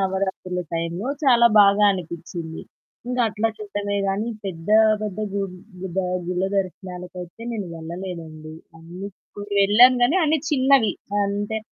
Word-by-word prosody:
నవరాత్రుల 190 -1 -2
టైంలో 170 +7 -2 0.2
చాలా 240 -3 +6
బాగా 200 +1 +5
అనిపిచ్చింది. 170 -2 -6 0.5
ఇంకా 250 0 -1
అట్లా 215 +2 0
చూడడమే 205 -1 -3
కానీ, 205 +4 -1 0.2
పెద్ద 170 -3 -6 0.3
పెద్ద 210 -2 -4
గు 200 0 -1 0.4
గు 190 - -4 0.4
గుళ్ళ 180 +1 -1
దర్శనాలకైతే 180 0 -5
నేను 210 -4 -4
వెళ్ళలేదండి. 165 -2 -7 1.1
వెళ్ళాను 235 +6 +7
కానీ 260 +9 +4
అన్ని 310 +1 +2
చిన్నవి. 265 -6 +4 0.3
అంటే 205 +2 -2
195 Hz, 115 wpm, -23 LUFS, 180-215 Hz, 1.1 s, వెళ్ళాను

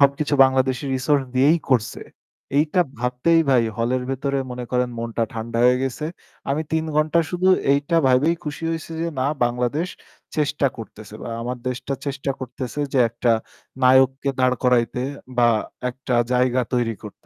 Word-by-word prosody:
সবকিছু 140 +1 +3
বাংলাদেশি 130 0 +1
রিসোর্স 135 +2 +2
দিয়েই 140 +6 +4
করছে। 120 -5 +1 0.6
এইটা 155 +4 +2 0.2
ভাবতেই 125 +7 +2
ভাই 125 -3 +5
হলের 120 +2 0
ভেতরে 140 +1 -1
মনে 125 0 -5
করেন 125 0 +1
মনটা 115 0 -2
ঠান্ডা 115 0 -4
হয়ে 125 0 +5
গেছে। 135 +3 -3 0.4
আমি 145 +3 0
৩ 160 0 +1
ঘন্টা 155 +2 +3
শুধু 180 +1 +1 0.2
এইটা 145 +4 +1
ভাইবেই 130 +6 +4
খুশি 150 +2 -5
হইছি 165 0 -5
যে 170 - -1
না 130 - +1 0.2
বাংলাদেশ 125 +8 -1 0.5
চেষ্টা 150 -2 +1
করতেছে 110 -2 -10
বা - - -6
আমার 125 +2 -3
দেশটা 125 +2 -4
চেষ্টা 140 0 -2
করতেছে 130 +1 -5
যে 135 - +2
একটা 120 +1 0 0.5
নায়ককে 130 +1 +4
দাঁড় 130 0 +3
করাইতে 125 -1 +2 0.4
বা 120 - +6 0.4
একটা 130 0 -4 0.2
জায়গা 125 0 +2
তৈরি 120 -2 0
করতে। 105 -2 -8
130 Hz, 155 wpm, -22 LUFS, 125-145 Hz, 0.6 s, বা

